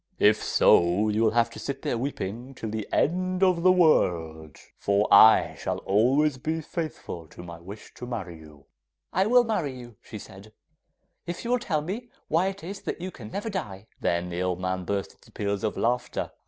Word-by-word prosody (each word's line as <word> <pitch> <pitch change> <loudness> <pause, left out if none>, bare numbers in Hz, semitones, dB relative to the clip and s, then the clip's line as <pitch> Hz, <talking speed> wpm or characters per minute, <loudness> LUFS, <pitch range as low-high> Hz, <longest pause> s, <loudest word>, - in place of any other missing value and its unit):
If 105 +1 +4
so 90 +5 +4
you 105 +1 0
will 115 - +4
have 115 0 +3
to - - -9
sit 140 -1 -5
there - - -1
weeping 120 0 -4
till 110 -3 -5
the 110 -1 -4
end 185 +3 +1
of 180 -3 +3
the 185 +1 +6
world, 80 - +2 0.2
for 100 +1 +2
I 110 +2 +7
shall - - -2
always 130 +8 +2
be 160 +4 -2
faithful 155 - -6
to 85 - -12
my 85 -1 -9
wish 100 +5 -11
to 125 - -7
marry 95 -9 -5
you!' 75 -1 -14
'Well, 70 - -23 0.5
I 190 +2 +3
will 245 +2 +6
marry 180 - -2
you,' 120 -4 -11
she 110 - -9
said, 105 +1 -13 0.7
'if 175 +6 -5
you 235 - -1
will 250 - +3
tell 160 -10 -1
me 215 +10 -5 0.2
why 170 +4 +2
it 195 0 -5
is 195 +4 -7
that - - -4
you 185 +2 -5
can 110 -9 -10
never 205 - -4
die.' 105 - -5
Then 85 +1 -1
the 90 +1 -3
old 90 -1 -1
man 95 0 -2
burst 100 +1 -2
into - - -22
peals 100 0 -3
of 110 - -1
laughter. 120 +2 -1
115 Hz, 205 wpm, -26 LUFS, -, 0.7 s, I